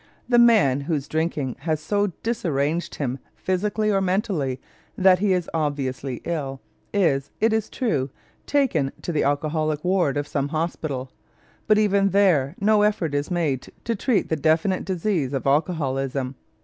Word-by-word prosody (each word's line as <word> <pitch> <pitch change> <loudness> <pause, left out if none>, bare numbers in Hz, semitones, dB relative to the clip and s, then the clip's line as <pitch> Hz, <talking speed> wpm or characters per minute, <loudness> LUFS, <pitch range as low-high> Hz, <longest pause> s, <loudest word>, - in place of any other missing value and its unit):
The 240 -1 +4
man 215 - +5
whose 145 -1 -2
drinking 155 -5 -2
has 155 +1 -1
so 205 +5 0 0.2
disarranged 170 -6 -1
him 135 -2 -3 0.2
physically 210 +3 0
or 195 -1 +2
mentally 180 - 0 0.4
that 185 -1 +5
he 205 0 +2
is 180 -2 +1
obviously 140 -5 -2
ill 140 -5 -3 0.3
is, 145 -9 +1
it 220 0 +3
is 220 -1 0
true, 150 - -1 0.4
taken 205 - +1
to - - -2
the 155 - +1
alcoholic 150 +1 0
ward 180 -6 +2
of 145 0 -2
some 140 -1 -1
hospital, 150 -4 -3 0.6
but 215 - +5
even 200 -2 +3
there 175 -7 +3
no 210 +1 +4
effort 205 -7 +1
is 145 0 -1
made 160 -8 -1 0.2
to 230 - -1
treat 225 +1 0
the 160 - +1
definite 160 +5 +1
disease 180 -7 -1
of 135 - -2
alcoholism. 135 -3 0
160 Hz, 150 wpm, -24 LUFS, 140-195 Hz, 0.6 s, man